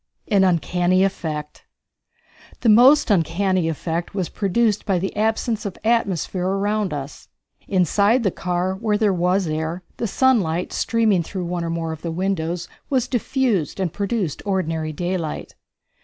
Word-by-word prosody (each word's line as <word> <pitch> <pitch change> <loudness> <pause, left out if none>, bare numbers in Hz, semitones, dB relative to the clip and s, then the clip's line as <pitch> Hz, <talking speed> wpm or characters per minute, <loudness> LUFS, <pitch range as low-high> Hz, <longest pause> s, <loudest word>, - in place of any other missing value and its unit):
An 200 -2 +4
Uncanny 180 +1 +2
Effect. 155 -6 -3 1.0
The 235 - +3
most 250 +4 +6
uncanny 185 0 +1
effect 165 +3 -3
was 185 -4 -1
produced 210 +1 +1
by 195 -4 +1
the 190 +2 -3
absence 220 +1 0
of 200 -4 -5
atmosphere 195 -5 0
around 205 +1 0
us. 145 -1 -6 0.4
Inside 200 - +2
the 195 - +2
car, 180 +2 -1
where 210 +1 0
there 205 -2 +2
was 180 +2 +1
air, 160 +3 -3
the 230 - -1
sunlight, 190 -8 +1
streaming 220 -5 +2
through 180 +2 -5
one 175 0 -3
or 165 - -3
more 165 -1 -2
of 160 - -7
the 170 - -4
windows, 175 -1 -2 0.2
was 260 -4 +1
diffused 245 - 0
and 185 -4 -1
produced 200 -5 -2
ordinary 165 -5 -1
daylight. 175 0 -3
185 Hz, 145 wpm, -22 LUFS, 170-210 Hz, 1.0 s, most